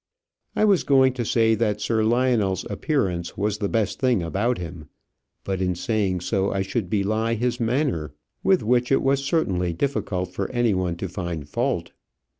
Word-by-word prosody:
I 215 - +3
was 200 -4 +4
going 130 -2 +4
to 125 -2 -2
say 115 0 +3
that 105 -2 0
Sir 110 0 +1
Lionel's 115 -4 +1
appearance 95 - -1
was 105 +1 -1
the 100 - -1
best 110 -3 0
thing 125 -8 +2
about 105 +9 0
him; 85 -3 -8 0.5
but 95 -1 -2
in 90 -1 0
saying 95 -1 -1
so 95 +1 0
I 95 -1 0
should 95 -1 -3
belie 110 +3 0
his 120 +1 -1
manner, 115 - -1 0.3
with 190 -2 +3
which 120 +3 +2
it 135 - +3
was 135 0 +2
certainly 95 - 0
difficult 90 -6 -2
for 100 +1 -3
any 120 -3 +1
one 90 -2 -1
to 95 - -4
find 85 -5 -5
fault. - - -1
105 Hz, 175 wpm, -24 LUFS, 90-125 Hz, 0.5 s, was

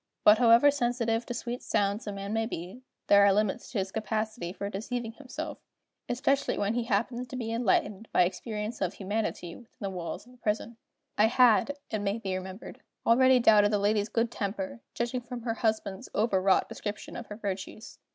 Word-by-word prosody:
But 210 +2 +7
however 240 +4 +7
sensitive 240 -3 0
to 245 - -3
sweet 245 0 -4
sounds 200 +2 0
a - - -2
man 200 +1 -5
may 225 0 0
be, 185 +4 -7 0.2
there 200 0 +6
are 200 - +6
limits 210 +3 0
to 235 - -4
his 190 -1 -1
capacity 215 -4 -3
for 200 +1 -5
deceiving 225 +3 -4
himself 260 +2 -7 0.5
especially 275 +3 +1
when 205 +2 0
he 240 0 -1
happens 235 +3 -1
to 255 - -8
be 230 -3 -3
enlightened 220 -2 0
by - - +5
experience 210 +4 -4
of 190 0 -1
humanity 200 -4 -3
within 235 - -17
the 195 -2 -3
walls 180 +1 -5
of 250 - -17
a - - -19
prison. 220 +1 -2 0.4
I 215 - +6
had, 250 +4 +4
it 215 - -1
may 200 +1 -1
be 195 -4 -3
remembered, 185 +2 -8 0.2
already 255 +2 +6
doubted 210 -3 +6
the 210 - +2
lady's 205 +1 +1
good 230 +1 0
temper, 240 +5 -4
judging 240 +1 -1
from 240 -1 -7
her 230 -2 -1
husband's 220 -4 -2
over 205 -3 +2
wrought 190 0 +3
description 210 0 -6
of 240 - -7
her 210 - -7
virtues. 200 +2 -6
220 Hz, 190 wpm, -29 LUFS, 200-240 Hz, 0.5 s, But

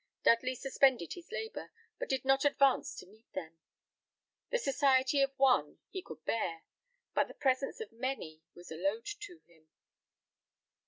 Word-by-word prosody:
Dudley 255 +2 +4
suspended 265 - +2
his 350 +2 -12
labour, 445 +1 -5 0.3
but - - -4
did 265 -1 0
not 270 0 +4
advance 275 -2 +3
to - - -9
meet 215 +4 -22
them. 165 -3 -6 0.9
The - - +2
society 275 - +3
of 275 0 +1
one 270 -2 +3
he 380 - -4
could - - -11
bear, 170 -7 -1 0.5
but - - +2
the - - -12
presence 270 - 0
of 450 - -6
many 230 -10 -4
was 175 -1 -12
a 160 - -5
load 195 +6 -1
to 410 -4 -7
him. 160 -2 -25
265 Hz, 155 wpm, -33 LUFS, 210-280 Hz, 0.9 s, Dudley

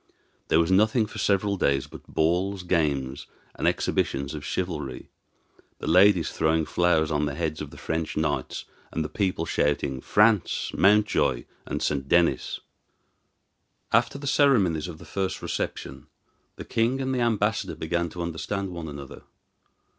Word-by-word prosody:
There 80 - +4
was 85 +2 +2
nothing 110 +4 +4
for - - -9
several 100 0 +1
days 70 -5 +1
but - - -13
balls, 90 +4 0
games, 70 -6 -1 0.3
and - - -1
exhibitions 70 +2 0
of 75 -2 -6
chivalry, 75 -7 -4 0.7
the - - -7
ladies 90 0 +5
throwing 80 0 +1
flowers 80 -1 +2
on 75 -1 +1
the 70 - -4
heads 80 -1 -2
of - - -5
the - - -13
French 80 -1 -3
knights, 75 -2 -2 0.3
and 80 - -2
the - - -4
people 90 -1 -1
shouting, 70 -4 0
"France! 105 -3 +2
Mountjoy 100 - +3 0.2
and - - -3
St. 70 -2 -1
Denis!" 85 -1 +2 1.3
After - - +3
the 140 - -8
ceremonies 105 - +3
of 85 -3 -8
the - - -13
first 95 -1 -2
reception - - -4 0.5
the - - -8
king 120 +4 +1
and 130 0 -1
the 125 - 0
ambassador 110 -2 0
began 85 +2 -1
to 85 +2 -5
understand 95 +4 -3
one 85 -2 -6
another. 70 -2 -9
85 Hz, 150 wpm, -26 LUFS, 75-100 Hz, 1.3 s, ladies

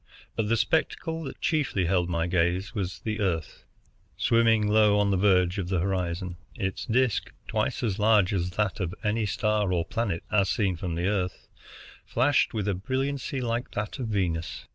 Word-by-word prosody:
But 105 -2 -1
the 115 - +3
spectacle 160 +4 0
that - - -8
chiefly 150 - +1
held 90 0 +1
my 85 -1 0
gaze 90 +3 0
was 95 -5 -3
the 110 0 -3
Earth, 85 -6 -2 0.5
swimming 115 -2 +3
low 105 -1 +4
on 100 -1 +2
the - - +2
verge 90 -1 +3
of 90 -2 -3
the 95 -2 +1
horizon. 90 -1 -2 0.2
Its 95 0 -3
disc, 125 0 +1 0.2
twice - - -1
as 105 -4 -1
large 105 -2 +4
as 90 -2 0
that 105 +1 0
of 90 0 -2
any 110 0 0
star 105 0 +1
or 85 -2 +1
planet 115 -6 -2
as 100 -2 +3
seen 100 -4 +1
from 85 -1 -4
the 85 +1 -1
Earth, 95 -3 -1 0.6
flashed 130 +4 +2
with 105 -3 -2
a 100 - +2
brilliancy 130 +7 -2
like 120 +1 -2
that 105 +4 -4
of 125 - -2
Venus. 90 -6 -2
100 Hz, 180 wpm, -27 LUFS, 90-115 Hz, 0.6 s, low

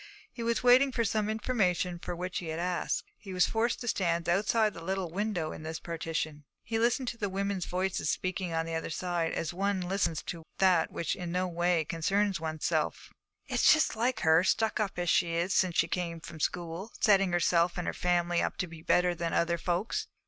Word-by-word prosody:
He 240 - -8
was 230 +1 0
waiting 255 +2 +6
for 235 -2 0
some 215 0 0
information 195 -6 0
for 175 - -5
which 180 +1 -3
he 175 - -7
had 160 0 -3
asked; 180 +1 -1 0.2
he 195 -3 -8
was 180 - +5
forced 230 +1 0
to 240 - -5
stand 170 -6 0
outside 210 +4 +2
the 165 - -9
little 190 -1 -2
window 190 -4 -2
in - - -8
this 160 +1 -5
partition. 160 -2 -4 0.2
He 225 -1 -2
listened 240 +2 +1
to 215 -4 -3
women's 195 -1 -2
voices 185 +1 -1
speaking 185 -1 -2
on 165 0 0
the 165 - -5
other 160 0 -3
side, 170 0 -1
as 165 +1 -2
one 195 +1 0
listens 180 -3 -1
to 170 - -6 0.2
that 180 -4 +4
which 165 - -2
in 175 -2 -5
no 180 +1 0
way 175 -1 +1
concerns 195 +5 0
oneself. 160 -1 -2 0.3
'It's - - +4
just 310 -5 +3
like 235 +1 0
her, 160 +2 +5
stuck 220 +3 +1
up 205 -4 -1
as 175 0 -2
she 170 -2 +2
is 175 +4 0
since 180 -3 +2
she 165 - +4
came 170 -1 -3
from 160 0 -10
school, 175 +6 -3
setting 195 -3 +4
herself 175 0 +2
and 180 - -2
her - - -1
family 175 -1 +1
up - - -2
to - - -1
be 165 -2 -11
better 180 +2 +3
than 170 -1 -3
other 170 0 +1
folks.' 200 - -1
180 Hz, 205 wpm, -30 LUFS, 170-205 Hz, 0.3 s, waiting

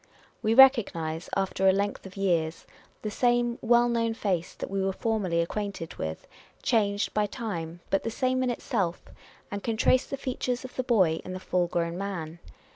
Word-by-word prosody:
Wo 220 +1 +2
recognise, 185 -12 +5
after 195 0 +1
a - - +8
length 200 0 -2
of 190 - -13
years, 170 -4 0 0.4
the 215 - -2
same 240 +1 +1
well 240 +1 +4
known 230 -1 0
face 185 -6 -2
that - - -6
we 195 0 0
were 195 0 +1
formerly 200 -7 0
acquainted 195 -1 -4
with, 80 0 -4 0.4
changed 205 -3 +1
by 210 -1 +1
time, 175 -8 -5
but 195 - +3
the - - -3
same 255 +2 0
in 255 - +1
itself; 200 -7 -2 0.5
and 200 0 -3
can 225 0 -2
trace 255 +3 +3
the 275 - -4
features 255 -1 -3
of 255 - -10
the - - 0
boy 190 -11 +2
in 185 - -6
the 185 - -5
full 180 -1 0
grown 170 0 -2
man. 170 -5 -5
200 Hz, 185 wpm, -28 LUFS, 175-235 Hz, 0.5 s, a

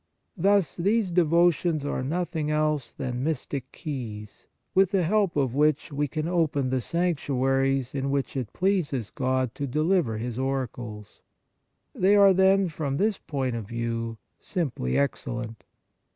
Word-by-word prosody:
Thus 195 -4 +2
these 200 +2 +1
devotions 170 -2 +3
are 145 - -2
nothing 160 +2 -2
else 150 -3 0
than 125 -2 -4
mystic 140 -3 -3
keys, 110 - -7 0.3
with 190 -1 +4
the 195 -2 +1
help 200 +1 +1
of 135 -5 +1
which 150 +2 +2
we 145 +1 0
can 155 +2 -3
open 155 -7 +1
the 130 -1 +1
sanctuaries 135 -5 0
in 135 0 -2
which 140 0 -1
it 125 -5 -3
pleases 175 - 0
God 130 -2 0
to 140 - -4
deliver 155 - +1
His 120 +2 -4
oracles. 120 -5 -4 0.7
They 195 +3 +4
are, 200 -1 +7
then, 190 +1 +4
from 150 -4 -3
this 210 +3 +1
point 130 -4 -2
of 110 -4 -5
view, 115 0 -3 0.2
simply 135 - -2
excellent. 120 -4 -2
140 Hz, 140 wpm, -26 LUFS, 130-175 Hz, 0.7 s, are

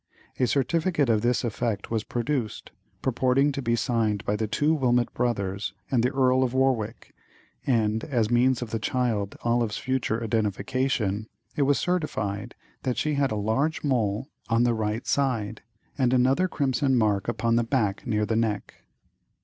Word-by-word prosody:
A 125 - +3
certificate 155 +4 +1
to 110 - +4
this 120 +4 +1
effect 115 -2 -2
was 110 -2 0
produced, 120 -2 -3 0.3
purporting 130 +3 +2
to 140 - -4
be 115 -2 +1
signed 110 -3 0
by 105 - +1
the 110 +1 -1
two 150 +8 +2
Wilmot 125 -5 +1
brothers 100 -5 -2 0.2
and 125 -3 +3
the 125 - +2
Earl 130 -1 +3
of 130 -1 0
Warwick, 125 -4 0 0.5
and 110 -4 +1
as 120 -6 0
means 125 +1 +3
of 115 - -8
the 115 - -1
child 110 -4 -1
Olive's 115 -2 +1
future 125 -3 -1
identification 110 0 -1 0.3
it - - 0
was 145 - +4
certified 110 - -2 0.3
that 125 -2 -2
she 155 - 0
had 140 -1 +1
"a - - -1
large 110 +10 0
mole 120 -4 0 0.2
on 115 +1 +3
the 120 -1 +3
right 110 +1 -2
side, 115 -7 0 0.4
and 130 -1 +3
another 130 +8 +3
crimson 135 -4 +1
mark 105 -4 +1
upon 115 -1 +1
the 120 - +3
back 115 -3 -1
near 105 -2 +1
the 110 - -1
neck." 110 -2 -1
120 Hz, 165 wpm, -26 LUFS, 110-130 Hz, 0.5 s, to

